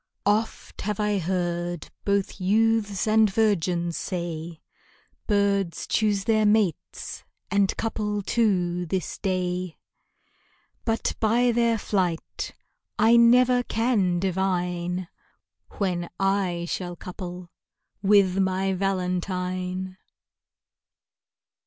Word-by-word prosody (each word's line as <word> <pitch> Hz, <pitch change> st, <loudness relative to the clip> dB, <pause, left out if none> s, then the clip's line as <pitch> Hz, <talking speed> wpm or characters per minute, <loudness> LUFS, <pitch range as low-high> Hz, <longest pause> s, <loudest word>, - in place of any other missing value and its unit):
Oft 215 Hz, +2 st, -1 dB
have 210 Hz, 0 st, -3 dB
I 210 Hz, -1 st, +1 dB
heard 175 Hz, -1 st, -2 dB
both 200 Hz, -1 st, 0 dB
youths 210 Hz, 0 st, +2 dB
and 215 Hz, 0 st, +5 dB
virgins 180 Hz, -5 st, +1 dB
say 170 Hz, -3 st, -4 dB, 0.7 s
Birds 200 Hz, -4 st, +1 dB
choose 205 Hz, -2 st, +1 dB
their 215 Hz, +1 st, +2 dB
mates, 210 Hz, -6 st, 0 dB, 0.3 s
and 200 Hz, -1 st, +2 dB
couple 210 Hz, -2 st, -2 dB
too 180 Hz, -6 st, +1 dB
this 185 Hz, +1 st, -3 dB
day; 180 Hz, -2 st, -2 dB, 1.1 s
But 225 Hz, -1 st, 0 dB
by 235 Hz, +3 st, +3 dB
their 235 Hz, -1 st, +2 dB
flight 185 Hz, -6 st, -2 dB, 0.4 s
I 225 Hz, +1 st, +5 dB
never 245 Hz, +1 st, +6 dB
can 225 Hz, -7 st, +1 dB
divine 180 Hz, -1 st, -1 dB, 0.7 s
When 180 Hz, -4 st, -1 dB
I 195 Hz, -3 st, 0 dB
shall 175 Hz, 0 st, -4 dB
couple 180 Hz, 0 st, -8 dB, 0.5 s
with 195 Hz, -2 st, +4 dB
my 190 Hz, 0 st, +1 dB
valentine. 185 Hz, 0 st, -2 dB
190 Hz, 90 wpm, -25 LUFS, 180-210 Hz, 1.1 s, never